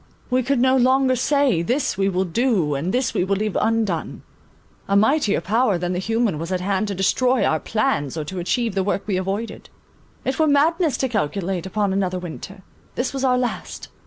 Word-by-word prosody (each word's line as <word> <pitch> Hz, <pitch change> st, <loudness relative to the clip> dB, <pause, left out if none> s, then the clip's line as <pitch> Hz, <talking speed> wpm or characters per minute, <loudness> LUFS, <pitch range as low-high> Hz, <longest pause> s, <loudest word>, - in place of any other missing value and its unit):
We 255 Hz, +1 st, +3 dB
could 270 Hz, +2 st, 0 dB
no 260 Hz, +1 st, +4 dB
longer 260 Hz, +1 st, +3 dB
say, 265 Hz, -, +2 dB
This 250 Hz, -, 0 dB
we 195 Hz, +1 st, +1 dB
will 190 Hz, 0 st, 0 dB
do, 190 Hz, -, +1 dB
and 145 Hz, +7 st, -2 dB
this 250 Hz, +1 st, 0 dB
we -, -, +1 dB
will 195 Hz, +2 st, 0 dB
leave 210 Hz, 0 st, -2 dB
undone. 220 Hz, -7 st, -1 dB, 0.6 s
A 200 Hz, -, +1 dB
mightier 220 Hz, +1 st, +3 dB
power 220 Hz, -1 st, +1 dB
than 175 Hz, +1 st, -2 dB
the 180 Hz, -, -2 dB
human 225 Hz, -4 st, 0 dB
was 165 Hz, +3 st, -5 dB
at 185 Hz, -, 0 dB
hand 195 Hz, +3 st, -1 dB
to 200 Hz, -, -3 dB
destroy 250 Hz, +7 st, +2 dB
our 160 Hz, -, +1 dB
plans 215 Hz, -, -1 dB
or 155 Hz, -, -2 dB
to 185 Hz, +4 st, -5 dB
achieve 225 Hz, +6 st, -1 dB
the 190 Hz, -1 st, 0 dB
work 200 Hz, 0 st, -1 dB
we 195 Hz, -3 st, -1 dB
avoided. 195 Hz, +5 st, -4 dB, 0.6 s
It 265 Hz, +2 st, -2 dB
were 315 Hz, -, +4 dB
madness 310 Hz, +2 st, +2 dB
to 265 Hz, -, 0 dB
calculate 190 Hz, -, -2 dB
upon 200 Hz, 0 st, 0 dB
another 185 Hz, -2 st, -1 dB
winter. 185 Hz, +2 st, -8 dB, 0.3 s
This 250 Hz, +2 st, -2 dB
was 270 Hz, -1 st, -3 dB
our 255 Hz, -1 st, +3 dB
last. 250 Hz, -1 st, -4 dB
210 Hz, 200 wpm, -22 LUFS, 185-255 Hz, 0.6 s, no